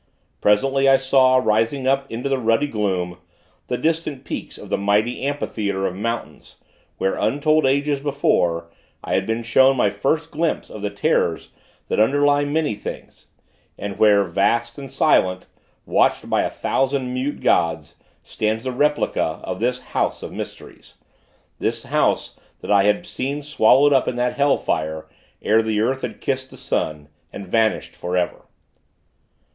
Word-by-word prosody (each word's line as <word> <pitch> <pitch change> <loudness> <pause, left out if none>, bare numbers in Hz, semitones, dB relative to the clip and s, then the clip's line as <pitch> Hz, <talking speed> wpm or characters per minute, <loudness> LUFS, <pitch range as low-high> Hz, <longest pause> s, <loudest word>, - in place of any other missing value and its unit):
Presently, 135 +6 +3
I 135 - +6
saw, 130 -1 +4
rising 115 +3 +1
up 135 +1 +1
into 120 +4 -3
the 135 -1 0
ruddy 115 +3 +2
gloom, 95 -8 -2 0.5
the 125 - -1
distant 155 -3 -1
peaks - - -6
of - - -11
the - - +2
mighty 105 +4 +1
amphitheatre 110 -8 -2
of 90 - -2
mountains, 115 +4 -5 0.4
where, 95 - 0
untold 155 +1 +2
ages 140 +1 +1
before, 90 - 0 0.3
I - - -3
had 95 - 0
been 115 +1 -1
shown 130 +4 +4
my 105 -5 +2
first 150 +10 -1
glimpse 165 +2 -2
of 105 - -8
the 105 - -1
terrors 100 0 0 0.4
that - - -1
underlie 145 +5 +3
many 150 -2 0
things; 105 - -9 0.5
and 100 -1 -6
where, 105 -2 +5
vast 115 +7 0
and 135 -1 -8
silent, 90 -5 +2 0.4
watched - - +1
by - - +1
a - - -1
thousand 135 -1 -1
mute 130 +3 -3
gods, 80 -3 +1 0.3
stands 110 +1 -2
the 130 - -2
replica 150 +4 0
of - - -5
this 125 +2 -1
house - - -2
of - - -6
mysteries - - -9 0.6
this - - -2
house - - 0 0.2
that - - -4
I 100 -1 +5
had 105 +12 +1
seen 140 -2 -4
swallowed 145 0 +4
up 135 - +2
in - - -1
that 125 0 0
hell 140 0 +2
fire, 80 0 -2 0.4
ere 110 +1 +4
the 110 -1 -1
earth 130 +5 0
had - - -6
kissed 130 -1 -2
the - - -13
sun, 75 -1 -2 0.2
and 100 - -8
vanished 110 +2 0
for 90 +1 -3
ever. 90 -1 -2
120 Hz, 160 wpm, -21 LUFS, 105-140 Hz, 0.6 s, I